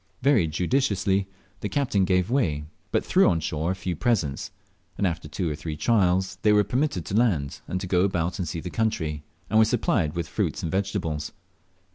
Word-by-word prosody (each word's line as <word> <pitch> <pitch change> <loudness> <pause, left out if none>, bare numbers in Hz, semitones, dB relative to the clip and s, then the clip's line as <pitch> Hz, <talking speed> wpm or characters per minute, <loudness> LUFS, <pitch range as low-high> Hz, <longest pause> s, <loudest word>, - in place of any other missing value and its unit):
Very 125 - +4
judiciously 95 - +1 0.3
the 105 - -3
captain 120 -9 +1
gave 90 +2 +1
way, 85 - +1 0.3
but - - +1
threw - - +4
on 80 - +1
shore 80 +1 -2
a 95 - 0
few 90 -1 -3
presents, 85 - 0 0.5
and - - +1
after 85 -4 -2
two 85 +4 -3
or 75 - -1
three 75 0 -5
trials 95 -2 +2
they 105 - +4
were 105 0 +5
permitted 120 - -1
to 90 - -6
land, 90 - +1
and 90 - -2
to 95 - -4
go 90 -1 +2
about 90 -2 0
and 90 - -2
see 80 +1 -4
the 90 - -6
country, 80 -10 -1 0.3
and 110 - +3
were - - +8
supplied 105 - +1
with 85 -2 -2
fruits - - -2
and 80 - -2
vegetables. 90 -6 -2
90 Hz, 195 wpm, -25 LUFS, 80-105 Hz, 0.5 s, were